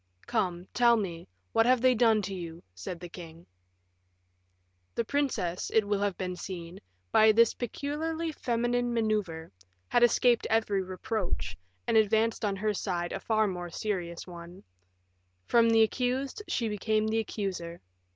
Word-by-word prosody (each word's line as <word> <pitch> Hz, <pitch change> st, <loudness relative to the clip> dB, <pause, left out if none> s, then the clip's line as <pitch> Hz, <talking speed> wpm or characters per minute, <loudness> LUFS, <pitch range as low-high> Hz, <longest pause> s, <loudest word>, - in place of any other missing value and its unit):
"Come, 185 Hz, -6 st, -1 dB
tell 235 Hz, -1 st, +5 dB
me, 175 Hz, -5 st, -4 dB, 0.3 s
what 225 Hz, -, +4 dB
have 255 Hz, 0 st, +5 dB
they 255 Hz, +1 st, +5 dB
done 225 Hz, -3 st, +3 dB
to 195 Hz, +1 st, -4 dB
you?" 170 Hz, -2 st, -7 dB
said 95 Hz, -, -6 dB
the 175 Hz, -, -7 dB
king. 170 Hz, -1 st, -11 dB, 1.5 s
The 235 Hz, -, 0 dB
princess, 220 Hz, -11 st, -1 dB
it 215 Hz, -2 st, +3 dB
will 205 Hz, -1 st, +1 dB
have 200 Hz, -2 st, -1 dB
been 180 Hz, -1 st, -3 dB
seen, 175 Hz, -1 st, -7 dB, 0.3 s
by 220 Hz, 0 st, +7 dB
this 230 Hz, +1 st, +5 dB
peculiarly 315 Hz, +6 st, -3 dB
feminine 240 Hz, -2 st, 0 dB
maneuver, 210 Hz, -8 st, -1 dB, 0.4 s
had 240 Hz, -, +3 dB
escaped 240 Hz, 0 st, +4 dB
every 220 Hz, -3 st, +2 dB
reproach, 185 Hz, -, -3 dB, 0.3 s
and -, -, +3 dB
advanced 220 Hz, +2 st, +2 dB
on 205 Hz, -2 st, +1 dB
her 210 Hz, +2 st, 0 dB
side 175 Hz, -3 st, -2 dB
a -, -, -3 dB
far 220 Hz, -1 st, +2 dB
more 180 Hz, -3 st, -4 dB
serious 175 Hz, -3 st, -3 dB
one; 175 Hz, 0 st, -11 dB, 0.8 s
from 230 Hz, -1 st, +4 dB
the 225 Hz, -1 st, +6 dB
accused 255 Hz, -, -1 dB
she 230 Hz, -, 0 dB
became 215 Hz, +1 st, 0 dB
the 220 Hz, +1 st, +1 dB
accuser. 190 Hz, -6 st, -4 dB
215 Hz, 150 wpm, -29 LUFS, 180-235 Hz, 1.5 s, by